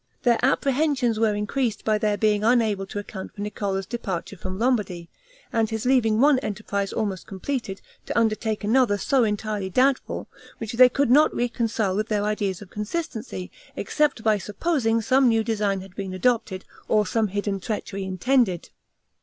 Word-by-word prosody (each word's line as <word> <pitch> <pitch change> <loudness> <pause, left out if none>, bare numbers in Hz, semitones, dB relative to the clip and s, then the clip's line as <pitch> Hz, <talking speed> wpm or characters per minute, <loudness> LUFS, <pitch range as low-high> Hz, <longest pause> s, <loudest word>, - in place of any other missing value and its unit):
Their 240 -1 +3
apprehensions 270 -3 +1
were 220 -2 +2
increased 220 +3 -2
by 215 -1 +2
their 210 -1 +1
being 210 0 +2
unable 220 -4 +2
to 205 - -7
account 200 -2 -7
for 205 - -7
Niccolo's 200 -2 -2
departure 195 -4 -4
from 185 +1 -6
Lombardy, 205 -8 -1 0.4
and 225 -1 +1
his 220 0 -3
leaving 235 -4 +3
one 280 0 +5
enterprise 200 -2 -3
almost 205 -4 -3
completed, 200 0 -4 0.3
to - - -2
undertake 220 -1 0
another 225 -1 +3
so 260 +4 +2
entirely 210 -2 -2
doubtful; 260 +6 +1 0.3
which 225 +1 -5
they 250 +2 +7
could 275 0 +1
not 300 +4 +6
reconcile 230 -5 0
with 215 +2 -1
their 210 -2 0
ideas 205 -2 -2
of 195 - -17
consistency, 220 - -5 0.2
except 295 -7 0
by 215 -2 +3
supposing 230 - 0
some 260 +2 +4
new 225 -1 +2
design 205 -4 0
had 190 -1 -13
been 190 -2 -5
adopted, 220 -3 0 0.2
or 215 -1 +3
some 220 0 +1
hidden 200 0 -2
treachery 200 -1 -4
intended. 190 0 +1
215 Hz, 160 wpm, -24 LUFS, 200-245 Hz, 0.4 s, they